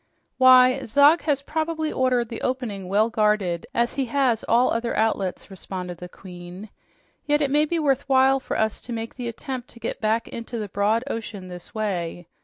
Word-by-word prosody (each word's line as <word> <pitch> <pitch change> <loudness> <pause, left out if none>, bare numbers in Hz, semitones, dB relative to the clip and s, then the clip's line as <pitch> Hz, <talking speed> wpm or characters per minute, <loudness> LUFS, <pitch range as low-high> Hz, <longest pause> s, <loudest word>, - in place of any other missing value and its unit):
"Why, 255 0 +6
Zog 285 +8 +5
has 285 -3 0
probably 315 +1 -2
ordered 250 -3 +1
the 230 - -6
opening 230 -7 -3
well 215 +4 +2
guarded, 210 -4 +1
as 240 -2 0
he 270 - +1
has 245 -2 +1
all 240 +3 +3
the - - 0
other 235 0 -3
outlets," 205 -4 -1
responded 180 -2 -7
the 180 - -8
Queen. 180 +2 -11 0.6
"Yet 295 0 +3
it 275 - 0
may 300 +1 +4
be 335 +2 -1
worth 280 -3 0
while 265 0 +4
for - - -4
us 220 -1 -1
to 245 - -7
make 225 0 -5
the 245 -2 -6
attempt 250 +1 -6
to 235 - -13
get 230 - -5
back 220 +1 0
into 235 +1 -6
the 210 -2 -4
broad 210 +4 +1
ocean 215 -7 -6
this 180 +3 -11
way. 175 -5 -3
230 Hz, 195 wpm, -24 LUFS, 200-265 Hz, 0.6 s, Why